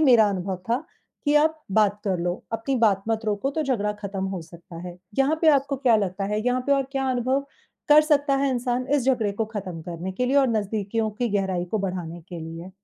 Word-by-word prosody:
मेरा 240 -8 +6
अनुभव 190 -1 -2
था, 250 +6 +1 0.4
कि 290 - +2
आप 315 +1 +3
बात 210 0 +3
कर 190 -4 0
लो। 175 +1 0 0.2
अपनी 225 +4 -1
बात 195 -3 +3
मत 225 0 0
रोको 210 +5 0
तो 315 - +2
झगड़ा 215 -7 0
खत्म 200 -2 -5
हो 190 -2 -4
सकता 170 +1 -13
है। 175 - -8 0.2
यहाँ 285 +4 +3
पे 325 - +5
आपको 275 -1 +2
क्या 255 -4 +4
लगता 195 -1 -1
है, 210 +1 -1
यहाँ 250 +1 +2
पे 280 - +4
और 275 -1 +3
क्या 270 -1 0
अनुभव 255 +2 +1 0.5
कर 300 +1 +9
सकता 290 -2 +2
है 275 - +2
इंसान 250 0 -1
इस 275 -4 +1
झगड़े 240 -6 +2
को 220 +3 -1
खत्म 185 -5 -5
करने 175 +2 -5
के 250 +6 -1
लिए 270 +3 +2
और 270 -2 +5
नज़दीकियों 215 0 -1
की 235 +3 -2
गहराई 190 -4 0
को 220 - 0
बढ़ाने 180 -3 -4
के 175 -2 -7
लिए? 165 +3 -8
215 Hz, 225 wpm, -25 LUFS, 190-265 Hz, 0.5 s, कर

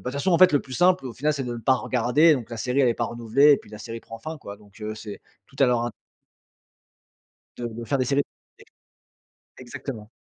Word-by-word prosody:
de - - -18
toute 125 - -3
façon 175 +6 0
en 170 - +4
fait, 185 - +8
le 145 - +3
plus 130 - -12
simple 180 0 +3
au 125 - -6
final 150 +7 0
c'est 140 -2 -3
de 120 - -4
ne 120 - -5
pas 130 +2 +3
regarder, 130 +6 +3
donc 120 -3 -6
la 115 - -5
série 125 +4 0
elle 130 - +4
est 115 - +1
pas 120 - -1
renouvelée 120 +6 +4
et - - +5
puis - - -15
la 105 - -9
série 115 +1 -7
prend 115 - -10
fin, 155 +7 -6
quoi. 100 -5 -9
Donc 105 +1 -20
heu, 105 0 -4
c'est 105 -2 -8 0.3
tout - - -23
à 135 - +6
leur 120 -1 +2
in 120 - -2 1.7
De 120 - -4
de 120 - -6
faire 135 +5 0
des 130 - +1
séries 140 +2 +2 1.4
é - - -10
exactement. 120 -3 -8
125 Hz, 250 wpm, -24 LUFS, 115-140 Hz, 1.7 s, fait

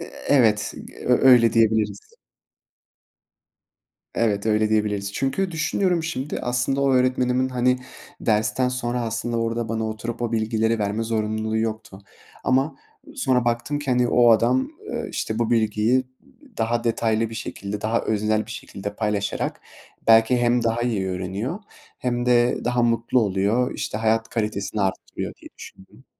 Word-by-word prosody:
Iıı, - - -7 0.2
evet, 110 -6 +3 0.3
ö 125 +1 +4
öyle 115 -3 +6
diyebiliriz. 115 - +1 2.0
Evet, 105 -2 0
öyle 110 0 +2
diyebiliriz. 105 -2 0
Çünkü 180 - -1
düşünüyorum 170 +2 0
şimdi, 150 -3 -3
aslında 125 +3 0
o 135 -1 +3
öğretmenimin, 130 0 +2
hani, 125 0 +1 0.4
dersten 110 +4 +1
sonra 125 -1 -2
aslında 115 +1 -2
orada 115 0 -2
bana 110 0 -2
oturup 115 +2 -5
o 120 - -2
bilgileri 110 0 +1
verme 105 +2 -1
zorunluluğu 110 -1 -1
yoktu 110 -3 -4 0.5
ama 135 +4 +1 0.4
sonra 130 - +1
baktım 120 +5 -1
ki, 145 -2 -3
hani, 125 -1 +2
o 120 -1 +5
adam, 120 +3 +3 0.2
ııı, - - -4
işte, 110 - -3
bu 120 -1 0
bilgiyi 115 +3 +2 0.5
daha 115 +1 0
detaylı 115 -1 0
bir - - -7
şekilde, 100 -1 -5
daha 110 +2 0
öznel 110 0 0
bir - - -11
şekilde 100 -3 -7
paylaşarak 105 -2 -2 0.5
belki 115 +2 +6
hem 120 0 +2
daha 115 +1 0
iyi 105 -6 -1
öğreniyor 95 - -3 0.4
hem 120 -1 -2
de 120 0 +3
daha 120 0 +1
mutlu 115 +1 +2
oluyor, 105 +5 +1
işte, 110 - -3
hayat 115 0 +1
kalitesini 105 -1 -2
artırıyor 95 -1 -3
diye - - -14
düşündüm. 95 +7 -14
115 Hz, 140 wpm, -23 LUFS, 110-125 Hz, 2.0 s, öyle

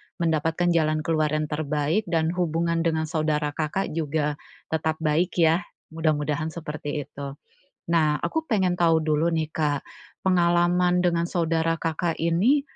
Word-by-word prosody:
mendapatkan 165 +1 +1
jalan 155 -2 +1
keluar 155 -1 +1
yang 155 0 0
terbaik 150 +6 -1
dan 165 -1 +1
hubungan 170 -1 0
dengan 160 -1 +1
saudara 155 -1 0
Kakak 155 +5 -2
juga, 150 -1 -1 0.4
tetap 160 0 0
baik 160 +4 +1
ya, 165 +1 +5 0.3
mudah-mudahan 155 -1 0
seperti 150 -3 -5
itu. 140 -1 -7 0.5
Nah, 155 -3 +3
aku 320 0 -1
pengen 190 - +1
tahu 165 -2 +3
dulu 155 +2 +1
nih 160 -1 -1
Kak, 150 -3 -1 0.4
pengalaman 175 0 +3
dengan 170 -1 +1
saudara 165 -1 0
Kakak 165 +1 -1
ini, 195 - +3
160 Hz, 135 wpm, -25 LUFS, 155-170 Hz, 0.5 s, ya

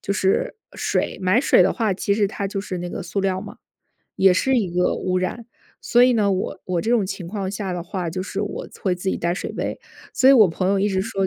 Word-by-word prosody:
就 200 - -1
是， 195 - 0 0.2
水。 - - -1
买 185 +6 +3
水 265 - +5
的 185 - +2
话， 220 -5 0
其 200 - -1
实 205 -1 +2
它 200 0 -4
就 195 0 -3
是 195 -2 -5
那 175 0 -5
个 - - -5
塑 185 +3 -3
料 190 -1 0
嘛， 205 0 -9 0.6
也 190 -1 +5
是 265 +8 +2
一 205 -7 0
个 180 +1 +1
污 185 0 -1
染。 185 +6 -3 0.3
所 240 - +3
以 250 0 +6
呢， 205 -3 +2
我 190 0 -3
我 180 -2 -1
这 225 - -1
种 230 -5 +2
情 185 -2 -6
况 195 -1 -3
下 195 -1 -4
的 175 -1 -4
话， 175 -1 -4
就 185 +3 -3
是 195 +1 -4
我 205 - -4 0.2
会 185 -3 +1
自 180 +2 -4
己 - - 0
带 170 0 -1
水 - - -5
杯。 - - -4 0.3
所 260 - +4
以 - - +9
我 220 -7 +7
朋 185 +3 -1
友 200 0 +2
一 205 - +2
直 190 -2 0
说 195 -1 -1
195 Hz, 275 characters per minute, -22 LUFS, 185-205 Hz, 0.6 s, 以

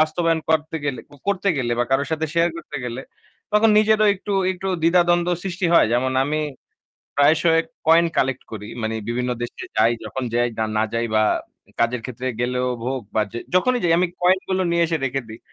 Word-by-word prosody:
বাস্তবায়ন 160 +1 +1
করতে 160 0 +1
গেলে 140 -3 -2
কো - - -17
করতে 200 0 +1
গেলে 120 -3 -1
বা 120 - +2
কারো 135 +1 +2
সাথে 160 0 -1
শেয়ার 170 +1 +3
করতে 155 -3 -8
গেলে 120 +1 -4 0.5
তখন 210 +2 +5
নিজেরও 215 0 +4
একটু 200 +1 -6 0.2
একটু 185 +1 -5
দ্বিধাদ্বন্দ্ব 175 +1 +3
সৃষ্টি 185 -1 -2
হয়। - - +6
যেমন 130 +2 +1
আমি 150 +2 -1 0.8
প্রায়শই 160 +3 +4 0.3
কয়েন 165 +1 +6
কালেক্ট 130 0 0
করি। 105 -1 -7
মানে 110 0 -2
বিভিন্ন 125 +1 -1
দেশে 120 - -5
যাই, 115 +2 +5
যখন 130 - -5
যাই 120 0 +2 0.3
না 110 - +3
যাই 115 0 0
বা 110 - +4 0.6
কাজের 115 0 +1
ক্ষেত্রে 130 0 -5
গেলেও 125 +1 0 0.2
হোক 130 0 -2
বা 110 - +3
যে 120 - -5 0.2
যখনই 250 +7 +3
যাই 165 - +3
আমি 180 +1 +2
কয়েন 185 +1 +4
গুলো 190 0 +1
নিয়ে 170 0 +3
এসে 165 0 -1
রেখে 135 +1 -2
দেই। 110 +1 -10
155 Hz, 190 wpm, -22 LUFS, 125-175 Hz, 0.8 s, হয়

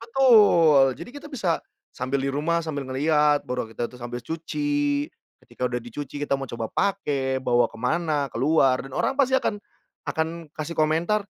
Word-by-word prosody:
betul, 205 - +5
jadi - - -8
kita 285 - -9
bisa 185 -10 -1 0.3
sambil 130 +2 -1
di 135 - -1
rumah 155 +5 0
sambil 150 -4 -4
ngeliat, 150 +2 +2
baru 125 -1 -2
kita 120 +1 -3
tuh 125 - -14
sambil 120 0 -6
cuci, 290 - -1 0.3
ketika 125 - -7
udah 125 0 -1
dicuci 140 +4 -7
kita 140 -1 0
mau 135 - -5
coba 115 -3 -5
pakai 140 -9 -1
bawa 120 -2 +2
ke 115 - -12
mana 150 0 0
keluar 135 -3 +2
dan 135 - -11
orang 270 - 0
pasti 265 -2 +2
akan 260 -5 +1 0.5
akan 160 -1 -3
kasih 160 +1 -6
komentar, 165 +7 +1
150 Hz, 170 wpm, -24 LUFS, 130-175 Hz, 0.5 s, betul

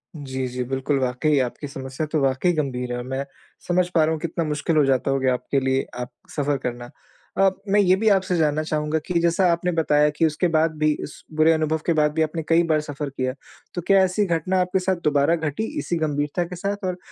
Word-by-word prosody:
जी, 130 -3 -4
जी 125 0 -3
बिल्कुल 135 +1 0
वाक़ई 130 +4 +1
आपकी 130 +3 -3
समस्या 135 +2 -5
तो 155 - +1
वाक़ई 135 +6 +2
गंभीर 130 -5 -2
है 120 - -2
और 120 - -4
मैं 135 +1 -3 0.4
समझ 180 0 +2
पा 160 - +5
रहा 155 - +2
हूँ 160 - -2
कितना 170 0 -2
मुश्किल 150 +2 -1
हो 150 - +5
जाता 135 0 +1
होगे 135 -1 0
आपके 130 +2 0
लिए 130 0 0
आप 125 0 -5 0.2
सफ़र 145 -1 0
करना। 120 0 -4 0.5
अ, 195 0 +5 0.2
मैं 205 +1 +4
ये 185 -2 +5
भी 220 +3 +2
आपसे 190 -2 +2
जानना 155 -1 +1
चाहूँगा 155 0 -1
कि 175 -2 +1
जैसा 170 +2 +3
आपने 170 +1 0
बताया 150 -3 +3
कि 150 +2 +1
उसके 160 +3 +1
बाद 160 +1 +3
भी 155 0 +2
इस 145 - -9 0.2
बुरे 155 +1 +5
अनुभव 160 0 0
के 170 - +2
बाद 150 0 +2
भी 160 - 0
आपने 160 +1 -1
कई 165 +1 +5
बार 155 - +3
सफ़र 145 -1 -5
किया 130 -2 -2 0.4
तो 175 - -2
क्या 195 -1 +6
ऐसी 190 +3 +1
घटना 180 +1 0
आपके 180 +1 0
साथ 185 +1 0
दोबारा 145 +2 +3
घटी 160 +3 -3 0.2
इसी 175 - -2
गंभीरता 150 +1 -1
के 180 +1 -8
साथ 200 +2 -3
और 180 -1 -2
155 Hz, 230 wpm, -23 LUFS, 135-170 Hz, 0.5 s, क्या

